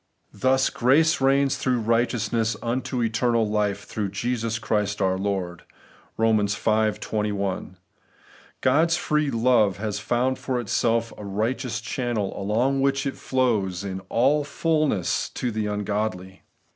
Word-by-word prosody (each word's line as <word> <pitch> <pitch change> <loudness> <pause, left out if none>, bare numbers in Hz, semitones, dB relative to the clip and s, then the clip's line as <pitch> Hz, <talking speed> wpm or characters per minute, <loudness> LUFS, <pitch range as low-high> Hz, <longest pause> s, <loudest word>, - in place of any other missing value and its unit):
Thus 130 0 +2
'grace 145 +6 +3
reigns 135 +1 +3
through 125 -2 0
righteousness 115 -1 0
unto 125 +1 -1
eternal 115 0 +1
life 105 -1 -1
through 105 -2 -3
Jesus 115 +2 -2
Christ 105 -3 -1
our 95 -1 +2
Lord 95 -2 -3 0.3
' - - -29
(Eoni. 110 -2 +2
V. 110 -1 +1
21).^ 100 -4 -2 0.9
God's 160 +6 +3
free 150 -2 0
love 115 -5 +3
has 105 0 -3
found 125 +4 0
for 130 -2 -2
itself 115 +1 0
a - - -7
right 105 +5 -1
eous 125 -3 -4
channel, 120 -5 -2
along 120 +7 0
which 135 0 +1
it 135 - -2
flows 105 -8 0
in 95 -1 -5
aU 135 +6 +3
its 145 - -8
fulness 155 - 0
to 125 - -2
the 110 -1 -2
ungodly. 105 -2 -3
115 Hz, 140 wpm, -24 LUFS, 105-130 Hz, 0.9 s, grace